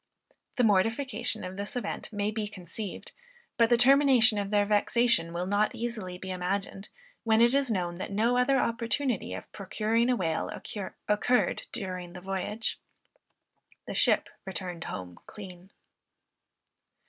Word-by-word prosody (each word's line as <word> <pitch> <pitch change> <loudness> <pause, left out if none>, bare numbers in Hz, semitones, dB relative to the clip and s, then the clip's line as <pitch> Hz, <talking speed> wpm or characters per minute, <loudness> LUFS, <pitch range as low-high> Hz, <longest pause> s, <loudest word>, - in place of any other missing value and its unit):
The 250 - +2
mortification 225 +4 +2
of 185 +1 -6
this 200 +3 -5
event 240 -2 -4
may 205 0 -1
be 215 -1 -2
conceived, 200 +1 -7 0.4
but 230 -1 +4
the 240 - +5
termination 250 -3 +5
of 200 -1 -2
their 205 -1 +3
vexation 210 -3 +2
will 175 +1 -2
not 205 +2 +1
easily 215 -6 -4
be 190 +1 -6
imagined, 195 +2 -3 0.3
when 220 -1 +3
it 235 +2 +5
is 275 -2 +2
known, 175 -4 -1
that 190 - -5
no 225 +5 +2
other 250 +2 +3
opportunity 230 - -1
of 95 - -9
procuring 220 +4 0
a 250 - +4
whale 165 -7 -1 0.6
occurred 210 +4 +1
during 185 -5 -5
the 180 - -8
voyage. 195 +4 -3 1.1
The - - -5
ship - - +3 0.2
returned 180 -3 -5
home 90 -2 -7
clean. 185 -3 -10
210 Hz, 140 wpm, -29 LUFS, 185-235 Hz, 1.1 s, the